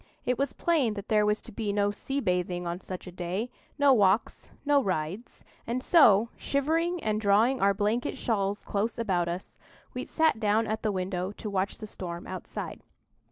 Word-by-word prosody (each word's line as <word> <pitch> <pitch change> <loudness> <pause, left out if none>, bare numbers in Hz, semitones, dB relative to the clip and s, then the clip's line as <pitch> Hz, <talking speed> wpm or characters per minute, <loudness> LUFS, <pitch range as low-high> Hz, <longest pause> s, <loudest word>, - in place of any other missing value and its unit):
It 250 0 0
was 275 -1 0
plain 285 -11 +1
that 200 0 -7
there 210 -1 +3
was 210 0 0
to - - -8
be 210 -1 -2
no 205 0 +1
sea 270 +7 -3
bathing 180 -4 -1
on 170 +1 -3
such 185 -1 -7
a 180 - -8
day, 185 +7 -3 0.3
no 285 -2 +6
walks, 205 -2 +2 0.2
no 285 -1 +4
rides; 185 +2 -3 0.2
and 245 +2 -2
so, 230 - +6
shivering 330 +5 0
and 215 0 0
drawing 220 +6 +3
our 200 0 +4
blanket 215 +4 0
shawls 200 -3 -1
close 210 +3 -2
about 185 -7 0
us, 175 +2 -6 0.3
we - - -4
sat 320 -7 +2
down 215 +1 +2
at 220 0 -2
the 215 - 0
window 185 0 -2
to 210 0 -6
watch 195 0 -1
the 215 - -7
storm 175 -4 -6
outside. 185 0 -6
210 Hz, 185 wpm, -28 LUFS, 190-240 Hz, 0.3 s, no